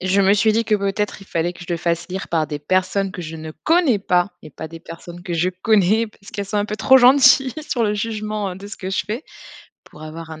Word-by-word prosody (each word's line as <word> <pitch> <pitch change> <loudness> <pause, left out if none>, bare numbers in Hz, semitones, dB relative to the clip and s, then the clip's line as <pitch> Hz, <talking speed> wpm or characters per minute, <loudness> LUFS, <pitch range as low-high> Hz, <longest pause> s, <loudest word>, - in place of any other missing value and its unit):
Et 185 - -3
je 195 +2 +3
me 195 0 +4
suis 215 +1 +3
dit 225 +2 +1
que 215 -1 +2
peut-être, 200 0 -2
il - - -15
fallait 170 0 -1
que 175 - -16
je 175 - -9
le - - 0
fasse 170 +1 -2
lire 190 +1 -5
par 160 -2 0
des 150 - -4
personnes 185 +5 0
que 175 - -6
je 160 0 -7
ne 155 0 -8
connais 320 - +3
pas 180 0 +1
et 155 - -11
pas 160 - -8
des 165 +1 -11
personnes 175 +1 -10
que 180 - -5
je 170 +2 +1
connais, 210 +3 +2
parce 200 0 -16
qu'elles 205 -3 -3
sont 210 +2 -3
un 205 - +1
peu 215 0 -4
trop 260 +6 +5
gentilles 265 +1 +6
sur 250 -6 -1
le 210 -1 0
jugement, 215 -1 -3
heu, 180 - -7
de 200 +1 -10
ce 205 - -8
que 190 - -6
je 190 - 0
fais. 225 +8 -4 0.6
Pour 150 - -15
avoir 160 +1 -8
un 160 - -9
195 Hz, 275 wpm, -20 LUFS, 170-215 Hz, 0.6 s, gentilles